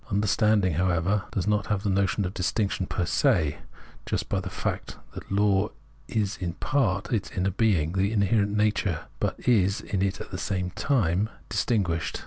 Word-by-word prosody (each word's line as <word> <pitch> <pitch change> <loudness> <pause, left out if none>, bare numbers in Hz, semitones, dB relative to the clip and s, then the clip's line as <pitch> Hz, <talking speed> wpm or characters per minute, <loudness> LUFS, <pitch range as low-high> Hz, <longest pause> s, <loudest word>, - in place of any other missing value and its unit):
Understanding, 105 -1 +2
however, 90 +4 +1
does 95 - -2
have 105 -1 0
the 105 - 0
notion 95 +1 +1
of 90 - -4
this 90 - -1
distinction 95 +1 -1
per 90 - -1
se, 85 - +2 0.5
just - - -2
by - - +1
the - - -5
fact - - -4 0.2
that - - -9
law 100 0 +3 0.4
is 105 -3 -1
in 85 -2 -2
part 100 -5 0
the 115 -4 0 0.2
inner 95 +1 +1
being, 95 -7 +2
the 95 +2 +1
inherent 105 0 +2
nature, 105 -6 +1 0.2
but - - -1
is 100 -5 +3
in 95 -2 -3
it 100 0 0
at - - -8
the 95 - -4
same 90 -2 -2
time 105 - +1 0.2
dis - - 0
tinguished. 85 -9 0
100 Hz, 175 wpm, -26 LUFS, 90-105 Hz, 0.5 s, law